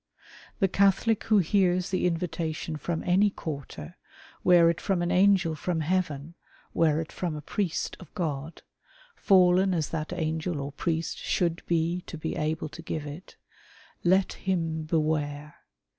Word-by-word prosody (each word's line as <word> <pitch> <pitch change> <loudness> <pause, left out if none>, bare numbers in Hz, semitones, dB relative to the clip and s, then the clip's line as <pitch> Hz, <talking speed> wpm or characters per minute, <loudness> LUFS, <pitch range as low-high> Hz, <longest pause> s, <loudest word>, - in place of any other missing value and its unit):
The 195 - +3
Catholic 200 +3 +2
who 215 - +4
hears 185 -1 +2
the 185 -1 +1
invitation 165 -2 -3
from 160 +2 -3
any 190 +3 +4
quarter, 140 - -7 0.5
were 175 -2 +6
it 170 -1 +1
from 185 -3 0
an 175 - -1
angel 185 -3 +4
from 160 +2 -2
heaven, 160 -2 -1 0.4
were 155 -2 +3
it 165 - -5
from 170 -4 -3
a 150 - -6
priest 180 +1 -2
of 180 - -13
God 155 -4 -4 0.3
— - - -28
fallen 185 - +4
as 155 -3 -1
that 155 -1 -4
angel 160 -1 -2
or 140 +1 -4
priest 165 +2 -2
should 170 -1 0
be 170 +1 0
to 165 - -7
be 160 +1 -4
al:)le 155 +1 -2
to 165 - -9
give 155 -2 -4
it 150 +5 -9 0.4
— - - -26
let 190 0 +2
him 165 -4 -2
beware. 150 -2 -1
165 Hz, 160 wpm, -27 LUFS, 155-185 Hz, 0.5 s, were